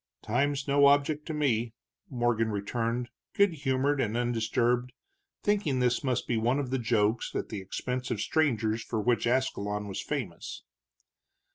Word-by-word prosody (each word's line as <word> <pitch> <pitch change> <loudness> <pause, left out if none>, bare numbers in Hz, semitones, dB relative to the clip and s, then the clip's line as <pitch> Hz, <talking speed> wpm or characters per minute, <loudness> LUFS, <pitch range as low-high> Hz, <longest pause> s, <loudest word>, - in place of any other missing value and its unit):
"Time's 140 +5 0
no 140 0 +5
object 145 +2 +2
to 160 - -3
me," 120 -6 0 0.3
Morgan 120 -3 +1
returned, 115 +4 -2 0.3
good 200 -3 +4
humored 140 -1 +1
and 115 0 -1
undisturbed, 120 +1 0 0.5
thinking 200 -10 +1
this 125 +1 +1
must 130 -3 -1
be 120 - +1
one 120 +4 +2
of 135 -3 -2
the 130 - 0
jokes 110 -1 +1
at - - -2
the 105 -3 -4
expense 125 +6 -4
of - - -2
strangers 115 -8 +1
for 115 - -3
which 120 +2 +1
Ascalon 105 -5 0
was 100 - -4
famous. 120 - -5
125 Hz, 150 wpm, -29 LUFS, 115-140 Hz, 0.5 s, no